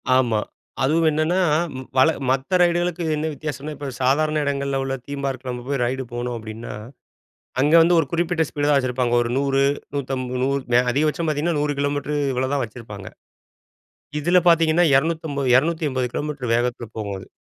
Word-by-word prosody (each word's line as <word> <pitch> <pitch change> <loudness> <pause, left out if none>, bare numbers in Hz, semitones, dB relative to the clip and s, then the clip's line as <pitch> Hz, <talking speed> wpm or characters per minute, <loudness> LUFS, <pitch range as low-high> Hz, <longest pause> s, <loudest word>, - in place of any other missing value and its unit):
ஆமா, 120 -4 +2 0.4
அதுவும் 160 +4 +3
என்னன்னா, 155 +4 +1 0.6
வழ 130 - +6 0.2
மத்த 135 +7 +1
ரைடுகளுக்கு 175 0 +1
என்ன 155 +1 -1
வித்தியாசம்னா? 150 0 -5
இப்ப 145 -1 -5
சாதாரண 155 +4 +2
இடங்கள்ல 140 -1 -1
உள்ள 135 0 -2
தீம்பார்க்ல 135 -2 -4
நம்ம 125 0 -6
போய் 140 -2 -1
ரைடு 130 +2 -2
போணும் 120 0 -3
அப்டின்னா, 110 +1 -8 0.9
அங்க 145 +4 +3
வந்து 170 +1 +4
ஒரு 155 - -2
குறிப்பிட்ட 170 -1 +1
ஸ்பீடு 145 0 -1
தான் 145 - +4
வச்சிருப்பாங்க 125 -2 0
ஒரு 120 - -3
100, 135 0 +1 0.3
150 130 -1 0
அதிகபட்சம் 155 +4 0
பார்த்தீங்கன்னா, 155 +2 0
100 145 0 0
கிலோமீட்டர் 145 +1 -1 0.2
இவ்வளோதான் 130 +1 0
வச்சிருப்பாங்க. 105 -4 -9 1.1
இதுல 175 +4 +4
பார்த்தீங்கன்னா 165 0 +4
250, 150 -1 0
280 145 -3 +1
கிலோமீட்டர் 140 -5 -3
வேகத்தில 120 0 -1
போகும் 100 -2 -3
அது. - - -12
140 Hz, 145 wpm, -22 LUFS, 125-155 Hz, 1.1 s, வழ